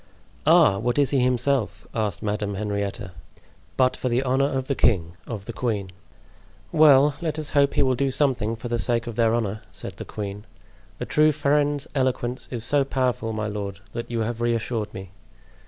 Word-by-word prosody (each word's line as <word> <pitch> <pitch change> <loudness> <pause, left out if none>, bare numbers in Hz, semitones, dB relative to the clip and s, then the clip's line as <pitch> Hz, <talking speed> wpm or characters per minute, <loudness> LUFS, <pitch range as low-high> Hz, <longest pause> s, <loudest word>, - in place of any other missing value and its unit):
"Ah! 100 0 +6
what 120 +4 -1
is 145 -2 +3
he 140 - +2
himself?" 125 -1 +1
asked 105 -3 -2
Madame 105 -1 -2
Henrietta. 100 -1 -3 0.7
"But 130 -1 +3
for 130 - -2
the 120 +2 +1
honor 135 +1 +2
of 130 -2 -2
the 140 - 0
king—of 100 -1 -1
the 115 - -6
queen." 105 -7 -2 0.8
"Well, 150 -2 +6
let 160 -2 -2
us 155 -2 -5
hope 140 -1 +3
he 145 - +4
will 130 -1 +2
do 135 +2 0
something 125 -5 +1
for 120 +2 -7
the 120 0 -1
sake 115 +3 0
of 115 - -6
their 115 0 +3
honor," 110 -2 -2
said - - -8
the - - -6
queen. 105 0 -6 0.5
"A - - -3
true 155 0 +4
friend's 145 -1 +1
eloquence 130 -2 -1
is 120 -3 -3
so 140 +4 +3
powerful, 125 -4 -1
my 110 -1 -3
lord, 100 -2 -4
that 120 0 -5
you 115 -1 -1
have 115 +1 -3
reassured 115 -2 -1
me. 95 -2 -9
120 Hz, 185 wpm, -24 LUFS, 105-135 Hz, 0.8 s, Ah